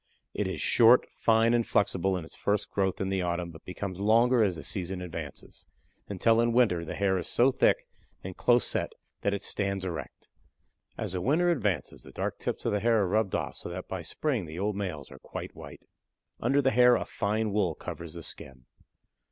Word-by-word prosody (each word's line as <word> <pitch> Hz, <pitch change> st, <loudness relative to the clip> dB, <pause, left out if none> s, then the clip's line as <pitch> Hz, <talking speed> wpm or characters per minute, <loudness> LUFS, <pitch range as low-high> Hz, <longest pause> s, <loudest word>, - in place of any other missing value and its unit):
It -, -, -1 dB
is -, -, -4 dB
short, 120 Hz, +2 st, +5 dB
fine, 115 Hz, +1 st, +3 dB
and 120 Hz, -1 st, +3 dB
flexible 95 Hz, -3 st, +1 dB
in 85 Hz, -, -6 dB
its -, -, -12 dB
first 100 Hz, 0 st, -1 dB
growth 95 Hz, -2 st, 0 dB
in 95 Hz, -, -1 dB
the 95 Hz, -1 st, 0 dB
autumn, 85 Hz, -1 st, -2 dB
but 80 Hz, -1 st, -14 dB
becomes 95 Hz, 0 st, -5 dB
longer 115 Hz, +4 st, +4 dB
as 100 Hz, -5 st, +2 dB
the 80 Hz, -, -7 dB
season 95 Hz, -1 st, -3 dB
advances, 85 Hz, -5 st, -8 dB, 0.4 s
until 115 Hz, +4 st, +3 dB
in 120 Hz, 0 st, +1 dB
winter 105 Hz, -9 st, +3 dB
the 80 Hz, -, -6 dB
hair 95 Hz, -2 st, +1 dB
is 85 Hz, -, -5 dB
so 130 Hz, +3 st, +4 dB
thick -, -, +2 dB, 0.4 s
and 95 Hz, -1 st, -6 dB
close 120 Hz, 0 st, +3 dB
set -, -, -2 dB, 0.3 s
that 100 Hz, 0 st, +1 dB
it 100 Hz, -, -6 dB
stands 100 Hz, -2 st, -1 dB
erect. 85 Hz, -3 st, -6 dB, 0.7 s
As -, -, -4 dB
the 90 Hz, -, -2 dB
winter 165 Hz, -, +3 dB
advances 105 Hz, -, -1 dB
the -, -, -13 dB
dark -, -, -3 dB
tips -, -, -4 dB
of -, -, +1 dB
the 105 Hz, -, +1 dB
hair 115 Hz, 0 st, +3 dB
are -, -, 0 dB
rubbed 105 Hz, +1 st, +1 dB
off -, -, -3 dB
so -, -, -7 dB
that 90 Hz, +1 st, -6 dB
by 95 Hz, -2 st, -4 dB
spring 115 Hz, -, -2 dB
the 80 Hz, +2 st, -8 dB
old 100 Hz, +2 st, -1 dB
males 90 Hz, -9 st, -5 dB
are 65 Hz, -, -12 dB
quite -, -, -7 dB
white. -, -, -11 dB, 0.5 s
Under 135 Hz, +4 st, +2 dB
the 135 Hz, -, +3 dB
hair 125 Hz, +1 st, +6 dB
a -, -, -2 dB
fine 105 Hz, +1 st, -1 dB
wool 95 Hz, -6 st, +1 dB
covers 85 Hz, -1 st, -8 dB
the 85 Hz, -, -7 dB
skin. 65 Hz, -4 st, -7 dB
100 Hz, 210 wpm, -28 LUFS, 90-115 Hz, 0.7 s, hair